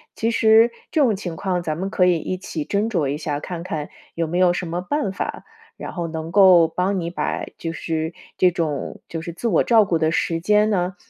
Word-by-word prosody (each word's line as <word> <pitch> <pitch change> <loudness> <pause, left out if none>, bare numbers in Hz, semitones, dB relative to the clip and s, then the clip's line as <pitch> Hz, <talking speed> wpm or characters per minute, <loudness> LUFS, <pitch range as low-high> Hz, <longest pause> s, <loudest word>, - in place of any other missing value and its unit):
其 225 - 0
实 225 +1 +5 0.2
这 310 - +2
种 230 -7 +3
情 180 -4 -6
况 180 -1 -2
咱 155 -2 -2
们 190 +3 -3
可 180 - +2
以 180 -2 +3
一 185 +4 -4
起 160 -4 -5
斟 210 +3 0
酌 165 -10 0
一 145 +2 -2
下， 145 -2 -3
看 170 +1 -6
看 155 -4 -4 0.3
有 165 -1 -1
没 175 +3 -2
有 180 -1 +5
什 180 -1 -3
么 175 +2 -3
办 250 0 -1
法， - - -5 0.3
然 - - -7
后 170 -2 -3
能 160 0 -5
够 185 -5 +7
帮 190 +3 -1
你 170 -1 -3
把 175 - -3
就 165 - -4
是 160 0 -3 0.2
这 180 -1 +4
种 155 -5 -3
就 165 - -5
是 170 +1 -6
自 180 +8 -3
我 185 -8 +3
照 225 -3 +5
顾 175 -4 +1
的 160 0 +2
时 165 0 0
间 210 +3 +3
呢， 185 -2 0
175 Hz, 250 characters per minute, -22 LUFS, 165-200 Hz, 0.3 s, 够